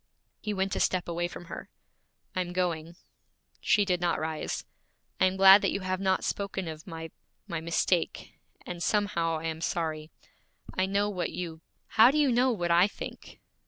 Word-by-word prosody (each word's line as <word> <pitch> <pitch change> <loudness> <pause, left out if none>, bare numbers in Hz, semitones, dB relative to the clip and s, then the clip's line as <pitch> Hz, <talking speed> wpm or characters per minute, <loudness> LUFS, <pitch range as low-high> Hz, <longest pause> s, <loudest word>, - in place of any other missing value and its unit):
He 210 - -3
went 195 -1 -1
a - - -1
step 185 -1 +1
away 175 0 -1
from 175 - -10
her. - - -8 0.7
'I'm 180 -1 -2
going.' 170 -2 -2 0.6
She 205 - +3
did 180 -2 0
not 175 -1 +1
rise. 155 0 -3 0.5
'I - - +5
am 185 +1 -2
glad 195 +1 +9
you 200 - 0
have 185 0 -2
not 190 -1 +1
spoken 195 -2 -3
of 160 +1 -8
my 165 -2 -7 0.4
my 170 -1 -3
mistake; 170 +1 0 0.3
and 175 -1 -6
somehow 170 -5 +1
I 160 - -7
am 160 0 -3
sorry. 155 -2 -2 0.7
I 185 0 +1
know 200 +1 +1
what 185 -4 -2
you 165 -3 -6
' - - -47
'How 225 +2 +9
do 285 - +1
you 290 -3 +4
know 250 +2 +3
what 175 -6 -1
I 175 +3 +6
think?' - - -9
180 Hz, 180 wpm, -29 LUFS, 165-195 Hz, 0.7 s, glad